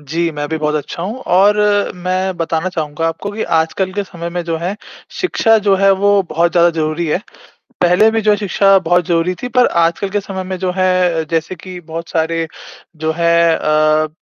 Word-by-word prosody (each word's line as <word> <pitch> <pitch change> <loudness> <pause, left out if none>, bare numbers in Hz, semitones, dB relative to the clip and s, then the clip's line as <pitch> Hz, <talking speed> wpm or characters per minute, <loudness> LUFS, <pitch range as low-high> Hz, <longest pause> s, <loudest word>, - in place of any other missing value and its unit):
जी, 165 +4 -2
मैं 145 -1 -4
भी 160 - -2
बहुत 150 0 -1
अच्छा 155 +3 -4
हूँ 210 +6 -4 0.2
और 205 +2 +5 0.4
मैं 185 +1 -2
बताना 165 +1 -1
चाहूँगा 160 -1 -3
आपको 165 +5 -5
कि 220 - -3 0.2
आजकल 185 +4 -1
के 205 - -2
समय 170 -3 -7
में 175 0 -3
जो 165 -1 -2
है 180 +5 -3 0.4
शिक्षा 225 -11 +3
जो 200 -1 +2
है, 195 +1 +4
वो 200 +1 +3
बहुत 170 +2 +1
ज़्यादा 170 0 +4
ज़रूरी 160 +1 -2
है। 155 - 0 0.6
पहले 180 +5 +4
भी 225 - 0
जो 215 0 +2
है 210 - +4
शिक्षा 195 -1 +3
बहुत 175 -1 +1
ज़रूरी 170 +1 +1
थी 250 - -3
पर 250 +1 +3 0.2
आजकल 170 +4 -1
के 205 - -1
समय 190 -1 -6
में 185 0 -4
जो 185 0 -1
है 180 -3 +1
जैसे 165 +2 -1
कि 180 +1 -10
बहुत 165 0 -7
सारे 165 0 -1 0.5
जो 160 +1 -1
है 170 -1 +3
अ, 155 0 +2
175 Hz, 200 wpm, -16 LUFS, 165-190 Hz, 0.6 s, और